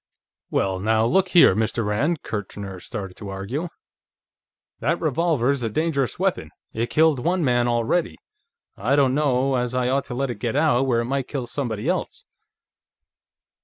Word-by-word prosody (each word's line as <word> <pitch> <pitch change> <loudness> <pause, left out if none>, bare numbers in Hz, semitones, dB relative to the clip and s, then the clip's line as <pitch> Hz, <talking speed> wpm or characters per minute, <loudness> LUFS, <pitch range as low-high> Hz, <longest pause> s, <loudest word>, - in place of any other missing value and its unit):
"Well, 95 -1 0
now, 110 +3 +2
look 190 +10 +3
here, 175 - +6
Mr. 110 +1 0
Rand," 140 +10 0
Kirchner 100 -2 -6
started 95 0 -6
to 105 - -8
argue, 100 - -4 1.1
"that 165 +3 0
revolver's 145 -4 +1
a 115 - -1
dangerous 140 -2 -1
weapon. - - -1 0.2
It's 115 +1 -2
killed 155 -3 +3
one 175 +2 +1
man, 120 -1 +2
already. 120 - 0 0.6
I 120 +8 +1
don't 135 -3 +3
know 135 -2 +1
as 125 0 -2
I 125 -1 +1
ought 135 +1 0
to 125 - -6
let 135 0 -1
it - - -8
get 120 0 -2
out, 145 -4 +3
where 120 -2 +2
it - - -3
might 135 +1 -2
kill 135 -4 -4
somebody 120 -2 -3
else." 180 0 -2
125 Hz, 165 wpm, -23 LUFS, 110-145 Hz, 1.1 s, here